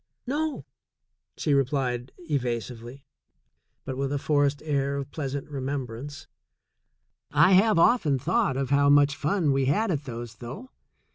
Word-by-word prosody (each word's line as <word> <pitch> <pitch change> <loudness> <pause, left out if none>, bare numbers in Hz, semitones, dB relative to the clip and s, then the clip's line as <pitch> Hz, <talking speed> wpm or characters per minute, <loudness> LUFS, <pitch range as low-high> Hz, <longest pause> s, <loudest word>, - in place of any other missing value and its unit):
"No," 295 +3 -2 0.7
she 150 - 0
replied 130 -2 0
evasively, 125 -4 -4 0.8
but 130 - -4
with 135 0 -2
a 145 - 0
forced 145 0 +1
air 140 -2 0
of 140 0 -5
pleasant 140 -2 -4
remembrance; 140 +1 -5 1.0
"I 185 - +5
have 200 +2 +5
often 165 - +4
thought 130 0 0
of 135 0 -2
how 140 0 +4
much 145 0 +5
fun 150 +1 +1
we 135 0 +1
had 195 +10 +1
at 150 -3 -2
those, 120 -3 -7
though. 135 - -9
140 Hz, 135 wpm, -26 LUFS, 130-150 Hz, 1.0 s, I